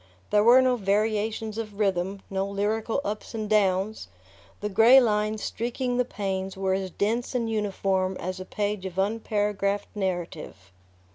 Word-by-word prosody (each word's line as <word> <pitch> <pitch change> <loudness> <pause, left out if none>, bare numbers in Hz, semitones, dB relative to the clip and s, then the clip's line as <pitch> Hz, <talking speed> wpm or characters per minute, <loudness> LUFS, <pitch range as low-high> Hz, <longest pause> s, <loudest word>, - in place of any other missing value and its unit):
There 210 0 +4
were 245 +3 +7
no 255 -1 +2
variations 215 +1 0
of 210 -3 -6
rhythm, 195 -1 0
no 195 0 -2
lyrical 215 +5 -1
ups 210 +3 -4
and 215 -1 -3
downs: 205 0 +1 0.5
the 210 - -2
grey 225 +6 +7
lines 215 -2 0
streaking 245 +1 -2
the 250 - +2
panes 190 -4 -4
were 190 -1 0
as 190 0 -2
dense 230 +7 -1
and 235 -2 0
uniform 195 -3 -1
as 185 +1 -4
a 185 - -6
page 205 -1 -2
of 180 - -9
unparagraphed 205 -1 -1
narrative. 175 - -4
205 Hz, 150 wpm, -26 LUFS, 190-220 Hz, 0.5 s, were